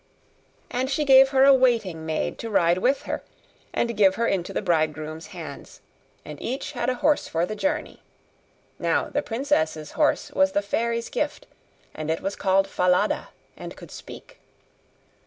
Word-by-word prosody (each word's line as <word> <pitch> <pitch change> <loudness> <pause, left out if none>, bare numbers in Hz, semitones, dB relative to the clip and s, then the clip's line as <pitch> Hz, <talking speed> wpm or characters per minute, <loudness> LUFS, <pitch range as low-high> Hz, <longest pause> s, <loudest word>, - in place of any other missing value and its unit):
And 255 +2 -1
she 295 +2 0
gave 270 -1 +7
her 265 -1 +4
a 275 - +8
waiting 220 -11 +1
maid 155 -1 -2
to 230 - -5
ride 175 -3 +3
with 260 +7 +1
her, - - -4 0.5
and 235 -1 -1
give 195 -2 +4
her 230 - 0
into 190 -6 -1
the - - -3
bridegroom's 155 -2 -1
hands; - - -10 0.5
and - - -9
each 260 +3 -4
had 245 -3 -2
a 255 - 0
horse 295 +4 +1
for 165 +1 0
the 215 - -5
journey. 290 +8 -2 0.8
Now - - 0
the - - -1
princess's 190 - -1
horse 300 -1 +1
was 285 0 +2
the 200 - +1
fairy's 230 +3 -1
gift, - - -3 0.5
and 155 0 -5
it 160 - -1
was 195 +1 -3
called 195 0 +2
Falada, 180 +2 +1 0.3
and - - -9
could - - -12
speak. - - -11
215 Hz, 165 wpm, -24 LUFS, 175-265 Hz, 0.8 s, a